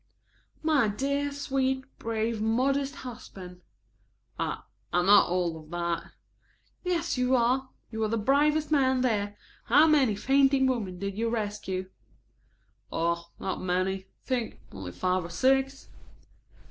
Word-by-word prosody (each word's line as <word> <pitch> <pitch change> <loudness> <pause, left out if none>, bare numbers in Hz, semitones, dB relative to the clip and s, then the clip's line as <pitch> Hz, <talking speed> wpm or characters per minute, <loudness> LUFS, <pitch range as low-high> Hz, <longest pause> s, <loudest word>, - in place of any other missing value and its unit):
"My 300 -7 +3
dear, 280 +7 -1
sweet, 265 -2 -1
brave, 225 0 -1
modest 270 +6 +1
husband." 185 -7 -9 0.8
"I - - -2 0.3
I'm 175 0 +2
not 205 -1 +7
all 175 -2 0
of 155 -1 -15
that." 170 0 -3 0.7
"Yes 340 -6 -1
you 250 +1 +3
are. 255 +2 +2 0.2
You 220 - -5
were 220 - +1
the 230 +2 0
bravest 295 +7 +2
man 260 -3 +3
there. 205 -4 0 0.3
How 310 - +6
many 280 -9 +4
fainting 270 +5 +3
women 220 -9 -1
did 200 +2 -4
you 230 0 +1
rescue?" 205 -4 -3 1.0
"Oh, 170 +1 -1
not 190 - -3
many. 185 +1 +1
I 190 -1 -10 0.2
think 245 -4 -2
only 95 -2 -7
five 185 - 0
or 170 - -7
six." 270 +7 +1
230 Hz, 135 wpm, -28 LUFS, 185-270 Hz, 1.0 s, not